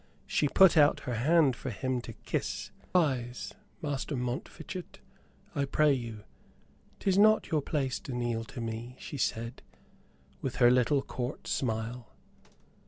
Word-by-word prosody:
She 150 - +1
put 190 +3 +6
out 145 -1 +5
her 125 - -3
hand 140 +3 +4
for 130 - -5
him 125 +3 -2
to 115 - -8
kiss. - - -3 0.2
"Rise, 130 -8 +1 0.3
Master 145 0 -2
Montfichet, 155 +8 -5 0.6
I 140 -2 0
pray 150 +1 +3
you, 115 -5 -5 0.8
'tis 195 0 +2
not 215 +1 +5
your 155 -2 +2
place 135 -3 -1
to - - -8
kneel 120 -2 -1
to 120 - -7
me," 115 +2 -5
she 145 - -7
said, 115 0 -2 0.8
with 130 -1 -3
her 120 -1 +6
little 130 +3 +3
Court 125 +1 -5
smile. 115 -1 -3
130 Hz, 140 wpm, -30 LUFS, 120-150 Hz, 0.8 s, put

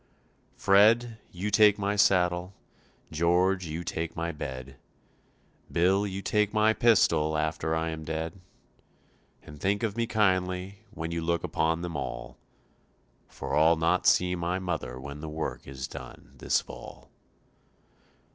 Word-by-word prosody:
"Fred, 110 +4 +4
you 95 +4 -4
take 105 0 +6
my 100 0 -1
saddle; 90 -2 +2 0.6
George, 90 +3 +2
you 80 +2 -4
take 80 -1 -4
my 85 +1 -2
bed; 65 -3 -7 0.9
Bill, 95 +4 +2
you 95 0 -5
take 105 +1 +1
my 110 +1 +4
pistol 80 -10 +3
after 80 +1 -1
I 80 0 -1
am 80 -1 -6
dead, 80 +3 -4 1.0
And 75 -1 -13
think 100 +3 0
of 110 -3 -1
me 115 0 -1
kindly 95 -2 0
when 85 -5 -6
you 85 0 -2
look 85 0 -1
upon 80 +1 0
them 85 -1 -5
all, 65 0 -6 0.9
For - - -5
I'll 80 +2 +5
not 80 +1 +1
see 90 0 +4
my 85 +1 -2
mother 80 -9 -4
when 70 +2 -8
work 80 0 -5
is 65 -1 -6
done - - -11
this - - +1
fall." - - -12
85 Hz, 135 wpm, -28 LUFS, 80-100 Hz, 1.0 s, take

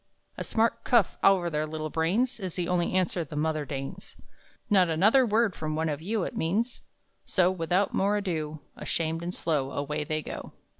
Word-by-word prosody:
A - - -4
smart 230 +1 +1
cuff 235 -7 +3
over 190 -3 +5
their 155 0 -1
little 155 0 -4
brains 205 +11 +1
Is 185 -4 -4
the 175 -2 -1
only 180 -1 +1
answer 185 -2 +1
the 150 - -9
mother 155 0 0
deigns 135 -1 -7 0.5
"Not 185 -4 +4
another 215 +11 +4
word 220 -2 +2
from 155 -1 -3
one 160 +1 0
of 145 0 -3
you!" 205 +3 -1
It - - -4
means, 220 +9 -1 0.4
so 185 -1 +3
without 185 +2 0
more 200 +2 +2
ado, 155 -6 -3
Ashamed 165 0 -1
and 175 +1 -3
slow 145 -5 0
Away 150 +2 -2
they 155 +1 -2
go. - - -7
170 Hz, 185 wpm, -28 LUFS, 155-200 Hz, 0.5 s, over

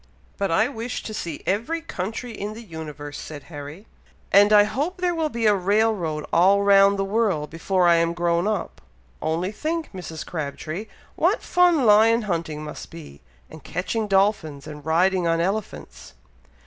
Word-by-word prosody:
"But 200 -1 0
I 215 +8 +3
wish 240 -2 -5
to 215 - -6
see 170 -7 -5
every 230 - -1
country 230 - -5
in 210 -1 -6
the 230 - -9
universe," 150 -5 -8
said 145 -3 -8
Harry; 145 +7 -8 0.5
"and 205 +2 +6
I 210 -1 +8
hope 290 - -2
there 360 -1 0
will 320 -2 -1
be 235 -4 -2
a 210 - +6
rail 205 +4 +2
road 155 -6 -4
all 195 +4 +5
round 200 0 +5
the 195 - 0
world 195 -8 0
before 180 +2 +1
I 170 -1 +5
am 170 0 +1
grown 170 +1 +1
up. 215 -3 -3 0.4
Only 165 +5 -1
think, 315 +7 -3
Mrs. 165 -4 -7
Crabtree, 155 +5 -5 0.3
what - - +1
fun 350 -6 +3
lion 225 +2 +5
hunting 165 -6 -3
must 150 -1 -8
be, 155 - -12 0.3
and 155 -3 -13
catching 200 +9 -3
dolphins, 195 -8 +1
and 150 -1 -9
riding 175 +3 +2
on 165 0 +1
elephants." 195 - -4
195 Hz, 170 wpm, -23 LUFS, 165-220 Hz, 0.5 s, I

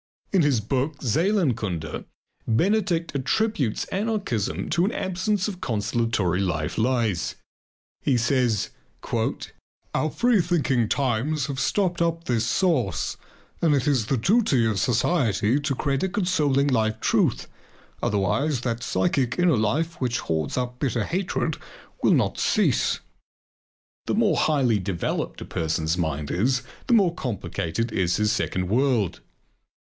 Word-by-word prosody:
In 190 - +4
his 140 -7 +2
book 135 +6 -1
"Seelenkunde," 120 - 0 0.4
Benedict 170 - +1
attributes 140 - 0
anarchism 195 - -1
to 175 - +2
an 200 - +1
absence 190 +1 -1
of 190 -4 -6
consolatory 110 -4 0
life 75 -5 -1
lies. 115 -6 0 0.7
He 135 -3 +2
says: 120 -3 +1 1.2
"Our 155 - +1
free 240 +2 +3
thinking 140 - +1
times 135 +2 0
have 135 -1 -4
stopped 180 -1 0
up 165 0 0
this 115 -5 0
source 140 - +1 0.5
and 160 -3 +4
it 135 - 0
is 130 -7 +1
the 135 - +1
duty 160 - +3
of 110 -3 0
society 120 - +2
to 140 -2 -1
create 135 0 -1
a 190 - 0
consoling 150 -8 +1
life 110 -4 +1
truth, - - +1 0.5
otherwise 115 - 0
that 120 -2 -2
psychic 130 -4 0
inner 175 -4 +4
life 140 +11 -1
which 120 -2 0
hoards 80 - -2
up 125 0 -3
bitter 120 -6 0
hatred 185 - -1 0.4
will - - +4
not - - 0
cease." - - +2 1.1
The - - +1
more 220 -1 +3
highly 130 -8 +2
developed 95 -2 -3
a - - -5
person's 80 0 -1
mind 75 -4 -2
is, 125 +8 +1 0.2
the 240 - +4
more 190 -6 +4
complicated 115 - -3
is 90 -4 +1
his 105 0 +2
second 90 -4 -1
world. 115 -3 +1
130 Hz, 130 wpm, -24 LUFS, 110-170 Hz, 1.2 s, In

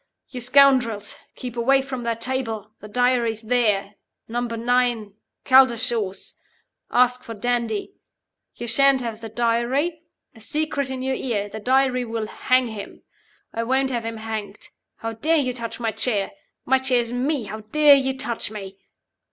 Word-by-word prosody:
'You 250 - -6
scoundrels. 250 -5 +4 0.2
Keep 245 -2 -7
away 270 +3 +3
from 260 -2 -5
that 230 -1 -2
table. 225 -5 -2
The 210 - -10
Diary's 235 -1 +1
there. 215 -4 +1 0.3
Number 235 0 -3
Nine, 240 -3 +1 0.3
Caldershaws. 240 -6 +3 0.5
Ask 250 0 +3
for 230 - -7
Dandie. 235 - -1 0.6
You 240 - -6
shan't 275 +2 +4
have 230 -2 -5
the 225 - -6
Diary. 240 +8 0 0.3
A 225 - -16
secret 300 +2 -1
in 260 -1 -4
your 265 0 0
ear. 210 -6 -2
The 220 - -7
Diary 255 +2 +2
will 225 -2 -3
hang, 255 +3 +1
him. 210 -2 -8 0.5
I 230 - -2
won't 265 +3 +1
have 235 -2 -2
him 225 0 -4
hanged. 220 -2 -6 0.3
How 225 0 -5
dare 315 +9 +1
you 255 -4 0
touch 235 -1 -4
my 225 -2 0
chair? 210 -4 -1 0.3
My 265 +1 +3
chair 260 -2 +3
is 235 0 -6
Me! 265 +2 0
How 215 +1 -6
dare 290 +7 +5
you 265 -1 +2
touch 240 -5 -3
Me? 195 -2 -8
240 Hz, 160 wpm, -23 LUFS, 225-260 Hz, 0.6 s, dare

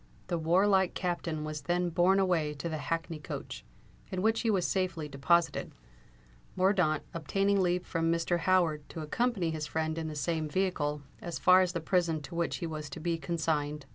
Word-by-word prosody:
The 170 -2 0
warlike 190 +3 +3
Captain 170 -3 -2
was 155 -1 -4
then 175 +4 0
borne 180 +3 +4
away 165 -6 +1
to 145 +4 -4
the 160 -2 -3
hackney 165 0 -3
coach, 150 - -7 0.5
in 185 0 -2
which 225 +1 +2
he 230 - 0
was 190 -4 +2
safely 180 -5 -1
deposited, 160 +5 +1 0.8
Mordaunt 185 -5 +2
obtaining 195 +5 +1
leave 180 0 +1
from 165 -1 0
Mr. 170 +1 +1
Howard 165 -5 +2
to 160 - -6
accompany 190 +1 0
his 155 -1 -3
friend 160 0 -2
in 160 - -3
the 155 - -5
same 155 +2 -1
vehicle 150 -5 -1 0.2
as 170 -1 -4
far 185 0 +6
as 180 -1 0
the 170 - -2
prison 170 -1 +1
to 170 - -9
which 170 -1 -1
he 175 - -4
was 155 -2 -5
to 135 - -7
be 170 0 -1
consigned. 150 -2 -1
170 Hz, 185 wpm, -30 LUFS, 155-185 Hz, 0.8 s, far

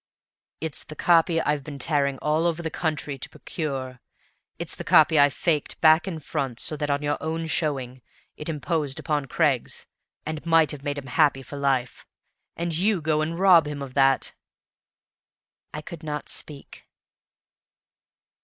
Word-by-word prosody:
"It's 160 -2 -1
the 155 - -10
copy 165 0 +3
I've 150 -3 0
been 145 0 -8
tearing 140 -1 +1
all 155 +3 +2
over 170 0 -2
the 160 - -3
country 150 -4 -2
to - - -4
procure. 130 -6 -5 0.6
It's - - -2
the - - -5
copy 155 0 +5
I 145 0 +7
faked 150 +3 -1
back 160 +3 +5
and 160 -5 -5
front, 135 -6 -3
so 155 - -1
that, 145 -1 -3
on 140 +1 0
your 145 0 -1
own 160 +2 -3
showing, 135 -6 -2 0.3
it 150 - -7
imposed 150 -2 -2
upon 150 -3 -1
Craggs, 140 -4 0 0.4
and 155 -1 -4
might 165 -3 +4
have 150 - -7
made 145 -1 -2
him 140 - -6
happy 135 0 +2
for 140 - -9
life. 135 -3 -1 0.5
And 170 -1 -1
you 195 +3 +2
go 155 -1 +1
and 165 +2 -2
rob 180 -5 +6
him 145 -1 -5
of 130 -2 -9
that!" 135 -1 +2 1.4
I 150 - -6
could 165 +1 -9
not 150 -2 -5
speak. 145 -2 -6
150 Hz, 165 wpm, -25 LUFS, 140-160 Hz, 1.4 s, I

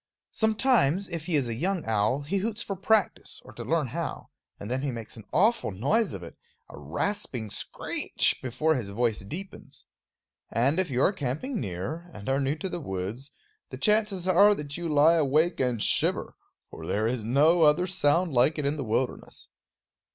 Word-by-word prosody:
Sometimes, 215 - +2
if 165 -2 -5
he 175 - 0
is 140 -4 +1
a 115 - -3
young 180 +8 -2
owl, 110 +5 +1
he 155 +8 -2
hoots 220 +3 -2
for 195 - -4
practice, 205 +3 0
or - - -13
to - - -7
learn - - 0
how; - - -4 0.3
and 100 - -7
then 130 +3 -2
he 140 - -2
makes 115 -3 -6
an 110 -3 -11
awful 220 - +2
noise 140 - +1
of 95 - -6
it, 85 - -10 0.3
a - - -11
rasping 110 - -3
screech, - - 0
before 130 +6 0
his 120 -9 -3
voice 110 +1 0
deepens. 170 - -8 0.6
And 135 - +1
if 185 -3 0
you 130 +1 +1
are 200 - +3
camping 170 - -3
near 125 - -5
and 105 -1 -9
are 135 +1 +2
new 140 +2 0
to 160 +5 -5
the 175 -2 -5
woods, 105 +5 -5 0.4
the - - -7
chances 210 -4 +1
are 200 +3 +6
that 145 -3 -6
you 170 -1 -4
lie 155 +3 +5
awake 155 +3 +2
and 125 -3 0
shiver; - - +1 0.4
for - - -9
there 105 +2 0
is 115 -1 -1
no 150 +9 +3
other 155 +3 +4
sound 175 -2 +1
like 130 +6 +3
it 150 - -2
in 145 +2 0
the 140 - -3
wilderness. 125 +3 -3
145 Hz, 190 wpm, -27 LUFS, 120-185 Hz, 0.6 s, are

